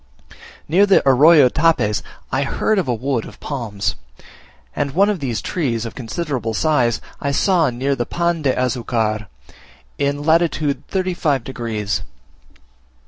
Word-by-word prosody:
Near 190 +6 +4
the 195 -7 +4
Arroyo 145 +2 +7
Tapes 125 -8 +1 0.3
I 130 - +1
heard 195 +8 0
of 180 - -2
a 125 - +1
wood 125 0 -1
of - - -12
palms; 115 -8 -3 0.8
and 140 -1 -2
one 200 +3 +4
of 200 - -3
these 125 -6 -3
trees, 120 -10 -2
of 115 - -6
considerable 125 -2 -3
size, 125 -7 +2 0.2
I 140 - -1
saw 170 0 +2
near 130 +3 -1
the 120 -2 -3
Pan 170 -1 -1
de 140 -3 +2
Azucar, 115 -4 -1 0.7
in 140 +1 -1
lat. 160 +2 +4
35 155 -1 -1
degs. 115 -5 -3
135 Hz, 140 wpm, -19 LUFS, 120-160 Hz, 0.8 s, Arroyo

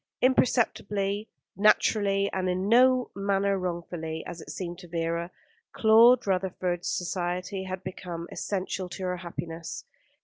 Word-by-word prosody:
Imperceptibly, 210 -5 +1 0.3
naturally, 200 -1 +3
and 185 -1 0
in 185 +2 -1
no 250 +2 +4
manner 200 0 +1
wrongfully, 170 -3 -4
as 170 -1 -7
it - - -11
seemed 175 -1 -5
to 180 - -11
Vera, 170 0 -2 0.5
Claude 230 +3 +6
Rutherford's 185 -2 -1
society 180 +2 -2
had 185 0 -5
become 175 -2 -6
essential 190 -1 -3
to 180 +2 -7
her 180 0 -1
happiness. 170 -2 -6
185 Hz, 125 wpm, -27 LUFS, 175-200 Hz, 0.5 s, Claude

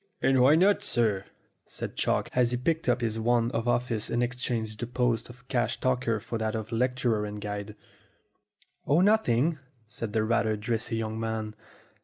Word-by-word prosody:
"And 135 -1 +3
why 135 +4 +6
not, 195 +5 +4
sir?" 110 -6 0 0.4
said - - -6
Chalk, - - 0
as 125 -1 +3
he 125 - -1
picked 160 +3 0
up 125 0 +2
his 115 -1 -1
wand 120 +1 +2
of 115 +1 -2
office 120 -3 0
and 120 +1 +1
exchanged 120 -3 -2
the 120 - -3
post 120 -2 0
of 125 +1 -15
cash 120 0 0
taker 125 -4 0
for 115 +2 -5
that 110 0 -1
of 110 0 -5
lecturer 120 -2 +1
and 105 0 -5
guide. 105 0 -5 1.1
"Oh, 150 +5 +4
nothing," 165 - +3 0.3
said 110 -1 -5
the 110 -1 +2
rather 110 -1 +1
dressy 115 +1 -2
young 110 0 -3
man. 110 -1 -3
120 Hz, 175 wpm, -28 LUFS, 110-125 Hz, 1.1 s, why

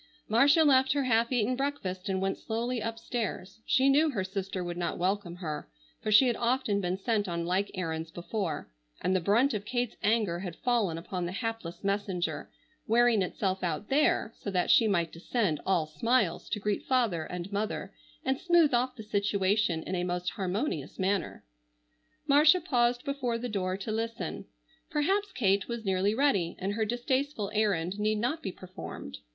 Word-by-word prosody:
Marcia 280 +8 +5
left 265 -3 +5
her 285 -1 +1
half 235 -1 +2
eaten 245 0 +1
breakfast 210 -9 -3
and 190 -1 0
went 195 0 0
slowly 235 +2 -2
upstairs. 225 -3 -4
She 265 +1 +4
knew 295 +3 +5
her 210 -10 -1
sister 190 -1 -4
would 175 0 -4
not 175 0 -2
welcome 185 -1 -1
her, 155 - -5 0.3
for 215 - -2
she 215 +6 +7
had 240 -2 +2
often 235 -4 +1
been 180 0 -1
sent 210 0 0
on 170 -1 -2
like 185 +3 0
errands 160 -3 -3
before, 175 +1 -4 0.3
and 185 - +1
the - - +3
brunt 230 - +3
of 205 -2 -2
Kate's 245 +2 -2
anger 210 -5 +1
had 180 -3 -5
fallen 230 -10 0
upon 175 +1 -4
the - - -4
hapless 200 -4 -4
messenger, 190 -6 -2 0.4
wearing 235 -1 +4
itself 190 0 -1
out 170 +3 -2
there 270 -5 +2
so - - -4
that 180 -2 +1
she 225 - +6
might 170 -5 +1
descend 170 - -1
all 175 -5 +2
smiles 230 +12 0
to 210 - -1
greet 205 0 -2
father 230 -11 +1
and 180 +2 -6
mother 210 +2 -3 0.3
and 265 +1 +1
smooth 345 -5 +4
off 250 +1 +1
the 220 - -8
situation 200 -4 +1
in - - -5
a 175 -1 0
most 180 0 -2
harmonious 190 - -3
manner. 190 0 -1 0.8
Marcia 300 +4 +6
paused 245 -7 +1
before 260 -4 -1
the 245 +2 -4
door 190 -4 -2
to 200 +3 -5
listen. 225 +1 -3 0.4
Perhaps 385 +7 +1
Kate 195 -4 +1
was 235 -2 -5
nearly 195 +2 +1
ready 215 -11 +2
and 195 +2 -2
her 220 +1 0
distasteful 245 -1 -1
errand 200 -3 0
need 215 +1 +1
not 250 +9 -1
be 190 - -4
performed. 185 0 -9
210 Hz, 175 wpm, -29 LUFS, 185-245 Hz, 0.8 s, she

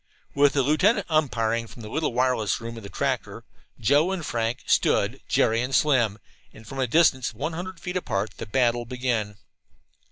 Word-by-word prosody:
With 140 -1 +4
the 140 - +2
lieutenant 185 - +2
"umpiring" 115 -7 +1
from 115 - -12
the - - -7
little 155 +7 -1
wireless 125 -5 +1
room 115 0 -7
of 115 - -8
the 100 - -9
tractor, - - -3 0.4
Joe 145 - +3
and 180 -5 -3
Frank 115 -1 -2
"stood" - - +2
Jerry 115 +1 +2
and 130 +2 -1
Slim, 120 -9 +3 0.3
and 110 - -15
from 135 +5 -7
a 130 - +1
distance 130 -2 +3
of - - -19
a 150 - -1
hundred 175 +2 -6
feet 180 0 -3
apart 105 - -2
the - - -7
battle 120 +1 +1
began. 120 -4 -2
125 Hz, 185 wpm, -25 LUFS, 115-150 Hz, 0.4 s, With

